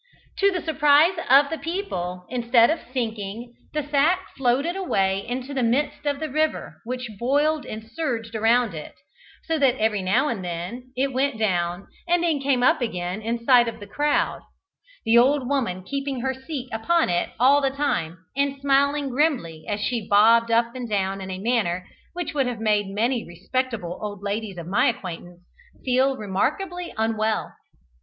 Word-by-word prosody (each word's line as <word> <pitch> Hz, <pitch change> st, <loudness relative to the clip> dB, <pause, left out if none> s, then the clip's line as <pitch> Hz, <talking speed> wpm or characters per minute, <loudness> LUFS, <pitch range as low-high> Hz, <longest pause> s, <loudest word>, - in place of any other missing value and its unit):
280] 400 Hz, -, +5 dB
To 375 Hz, -2 st, +1 dB
the -, -, -11 dB
surprise 300 Hz, +4 st, +5 dB
of 280 Hz, +3 st, +6 dB
the 320 Hz, -, -3 dB
people, 185 Hz, -, -4 dB
instead 240 Hz, 0 st, +3 dB
of 325 Hz, -, -1 dB
sinking, 230 Hz, -1 st, -4 dB, 0.2 s
the 300 Hz, -1 st, -2 dB
sack 305 Hz, +6 st, +1 dB
floated 270 Hz, +7 st, +1 dB
away 195 Hz, -, 0 dB
into 255 Hz, +3 st, -4 dB
the 265 Hz, -, -1 dB
midst 270 Hz, +5 st, 0 dB
of 285 Hz, -1 st, 0 dB
the 315 Hz, -, -2 dB
river, 310 Hz, +2 st, -1 dB
which 250 Hz, +1 st, -4 dB
boiled 290 Hz, +5 st, +1 dB
and 215 Hz, 0 st, -6 dB
surged 230 Hz, -5 st, -3 dB
around 225 Hz, 0 st, +2 dB
it, 155 Hz, -2 st, -8 dB, 0.5 s
so 325 Hz, -1 st, -1 dB
that 265 Hz, -3 st, +4 dB
every 215 Hz, -2 st, +1 dB
now 190 Hz, +10 st, +2 dB
and 225 Hz, -9 st, -3 dB
then 180 Hz, +9 st, -6 dB
it 270 Hz, +1 st, 0 dB
went 265 Hz, -1 st, 0 dB
down, 180 Hz, -3 st, -1 dB, 0.2 s
and 350 Hz, 0 st, +2 dB
then 325 Hz, -4 st, +1 dB
came 270 Hz, -3 st, +1 dB
up 315 Hz, +3 st, +4 dB
again 180 Hz, -3 st, -3 dB
in 230 Hz, +1 st, -3 dB
sight 245 Hz, -2 st, +6 dB
of 230 Hz, -, -5 dB
the 205 Hz, -, -8 dB
crowd 290 Hz, +8 st, 0 dB, 0.6 s
the 230 Hz, +1 st, +6 dB
old 265 Hz, +1 st, +3 dB
woman 235 Hz, -10 st, -1 dB
keeping 275 Hz, +2 st, -3 dB
her 265 Hz, +1 st, -1 dB
seat 265 Hz, 0 st, -6 dB
upon 325 Hz, +10 st, +2 dB
it 175 Hz, 0 st, 0 dB
all 275 Hz, +4 st, +5 dB
the 275 Hz, -, +2 dB
time, 250 Hz, -, -2 dB, 0.2 s
and 280 Hz, 0 st, 0 dB
smiling 280 Hz, +1 st, +2 dB
grimly 245 Hz, -, 0 dB
as 205 Hz, 0 st, -2 dB
she 225 Hz, 0 st, -2 dB
bobbed 230 Hz, +3 st, +5 dB
up 235 Hz, +1 st, +2 dB
and 250 Hz, -2 st, -6 dB
down 195 Hz, -1 st, -1 dB
in 190 Hz, -, -6 dB
a 185 Hz, -, -4 dB
manner 190 Hz, -5 st, 0 dB, 0.3 s
which 350 Hz, -2 st, -4 dB
would 275 Hz, -3 st, +1 dB
have 245 Hz, -3 st, -4 dB
made 210 Hz, -2 st, +1 dB
many 230 Hz, +5 st, 0 dB
respectable 210 Hz, 0 st, -3 dB
old 205 Hz, -2 st, -6 dB
ladies 205 Hz, -1 st, -3 dB
of 170 Hz, -, -6 dB
my 185 Hz, +4 st, +2 dB
acquaintance 175 Hz, -6 st, -5 dB, 0.4 s
feel 260 Hz, +1 st, +2 dB
remarkably 340 Hz, -, -2 dB
unwell. 220 Hz, 0 st, 0 dB
245 Hz, 175 wpm, -24 LUFS, 210-280 Hz, 0.6 s, of